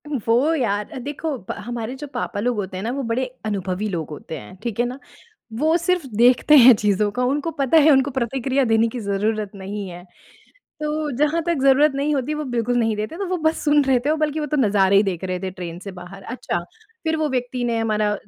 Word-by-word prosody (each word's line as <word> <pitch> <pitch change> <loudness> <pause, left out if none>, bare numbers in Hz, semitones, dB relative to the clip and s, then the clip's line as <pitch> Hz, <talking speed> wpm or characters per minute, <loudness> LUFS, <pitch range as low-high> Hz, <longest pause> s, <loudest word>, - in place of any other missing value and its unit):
वो 260 +3 +1
यार 210 -7 -1
अ, - - -7
देखो 290 +3 -4
ब - - 0 0.2
हमारे 240 +1 -4
जो 295 +2 -8
पापा - - -3
लोग 240 +2 0
होते 190 -2 -4
हैं 190 - -5
ना 230 - -2
वो 275 +1 -3
बड़े 235 +2 -1 0.2
अनुभवी 200 -1 -2
लोग 165 -5 -4
होते 155 +1 -7
हैं, 105 - -12
ठीक 235 -3 -4
है 240 - +3
ना? 250 +3 -5 0.5
वो 310 +8 +2
सिर्फ़ 350 -2 0
देखते 245 +6 +5
हैं 255 -2 +9
चीज़ों 205 0 +1
का 250 +3 -1
उनको 285 +5 0
पता 275 +3 +3
है - - +7
उनको 270 +1 +3
प्रतिक्रिया 265 +1 0
देने 225 -1 +3
की 240 +2 -6
ज़रूरत 210 0 -1
नहीं 200 +1 -6
है। 175 0 -10 0.8
तो 300 0 -1
जहाँ 300 +3 +2
तक 340 -3 +1
ज़रूरत 275 +2 +5
नहीं 290 +2 0
होती 280 +2 -1
वो 300 0 -3
बिल्कुल 245 -2 -1
नहीं 225 -2 +1
देते, 215 +9 -4
तो 395 - -2
वो 365 - 0
बस 315 0 +1
सुन 295 -1 +4
रहे 265 -2 +3
थे - - +3
और 310 - +2
बल्कि 305 0 0
वो 300 - -2
तो 300 - -1
नज़ारे 200 -6 +3
ही 200 - +6
देख 190 -3 -3
रहे 185 -1 -2
थे 190 0 -3
ट्रेन 175 -2 -7
से 195 - -7
बाहर। 185 +2 -10
अच्छा, 230 -4 -3 0.5
फ़िर 320 0 +1
वो 310 -1 0
व्यक्ति 250 -1 -2
ने 235 -1 0
हमारा 215 -2 +1
245 Hz, 235 wpm, -22 LUFS, 205-290 Hz, 0.8 s, हैं